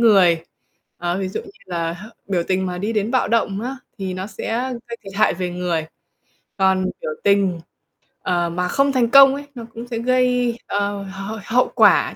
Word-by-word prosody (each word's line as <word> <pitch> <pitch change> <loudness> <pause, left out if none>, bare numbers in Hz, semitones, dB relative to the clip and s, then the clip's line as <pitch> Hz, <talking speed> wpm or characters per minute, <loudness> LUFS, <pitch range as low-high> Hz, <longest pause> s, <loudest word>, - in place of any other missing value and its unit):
người. 185 -8 +5 0.5
Ờ, 175 +1 -2
ví 190 -1 -2
dụ - - -4
như 400 - -13 0.2
là 170 -2 -2
h 185 +5 -9 0.2
biểu 185 -3 0
tình 190 0 +1
mà 180 -1 -4
đi 210 +4 -2
đến 210 0 0
bạo 255 -1 +2
động 205 -4 +1
á, 255 +4 -4 0.2
thì 190 -2 -3
nó 185 +1 -4
sẽ 240 +4 -3 0.2
gây 235 - -5
thiệt 195 -1 -9
hại 215 -3 +3
về 180 0 -3
người, 175 -3 -2 0.7
còn 190 -1 +3 0.2
biểu - - -3
tình, 195 -4 +3 0.6
ờ, 175 -1 0
mà 180 +1 -1
không 275 +7 +2
thành 245 -3 +2
công 275 0 +8
ấy, 285 - -6
nó 235 -2 -7
cũng 235 +1 -7
sẽ 235 -2 -3
gây, 250 -1 +2
ờ, 200 0 -1
h 195 +2 -6
hậu 250 +2 +2
quả - - +5
200 Hz, 200 wpm, -21 LUFS, 180-235 Hz, 0.7 s, công